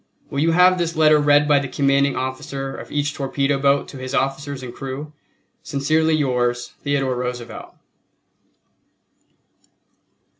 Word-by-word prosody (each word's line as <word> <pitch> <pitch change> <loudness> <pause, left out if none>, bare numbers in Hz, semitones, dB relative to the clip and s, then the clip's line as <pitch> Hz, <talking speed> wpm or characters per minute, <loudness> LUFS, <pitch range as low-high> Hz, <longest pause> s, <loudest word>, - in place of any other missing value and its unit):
Will 140 - -2
you 165 +2 +2
have 180 +1 +5
this 170 -1 -1
letter 155 -1 +5
read 145 0 +4
by 145 -1 +5
the 140 - -4
commanding 140 +1 +1
officer 135 +1 -4
of - - -10
each 145 0 -1
torpedo 140 0 -1
boat 140 0 +2
to 135 - -9
his 130 +1 -4
officers 135 0 -2
and 120 -1 -7
crew? 135 +3 -7 0.5
Sincerely 155 +3 +1
yours, 120 -4 -1
THEODORE 140 -2 0
ROOSEVELT. 125 -1 -6
140 Hz, 135 wpm, -21 LUFS, 130-150 Hz, 0.5 s, have